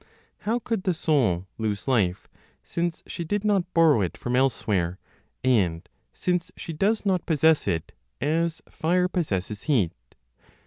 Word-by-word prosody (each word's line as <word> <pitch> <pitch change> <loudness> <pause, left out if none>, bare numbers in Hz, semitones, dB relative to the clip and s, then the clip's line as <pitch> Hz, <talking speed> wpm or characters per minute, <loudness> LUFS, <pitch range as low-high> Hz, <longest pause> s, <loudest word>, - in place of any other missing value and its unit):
How 235 - +3
could 225 -3 -2
the 185 -2 0
soul 125 - +1
lose 105 0 -2
life, 100 -9 +1 0.4
since 170 -1 -2
she 175 - -5
did 205 +5 -2
not 195 -4 +1
borrow 160 -9 +5
it 90 - -2
from 120 0 -2
elsewhere, 100 -9 +1 0.5
and 95 -10 +2 0.2
since 180 -1 -1
she 165 - -6
does 210 +7 +1
not 185 -4 +1
possess 160 -3 +3
it 85 -5 -1 0.3
as 165 +2 0
fire 180 +3 +1
possesses 105 - -2
heat? 120 - +2
155 Hz, 140 wpm, -26 LUFS, -, 0.5 s, borrow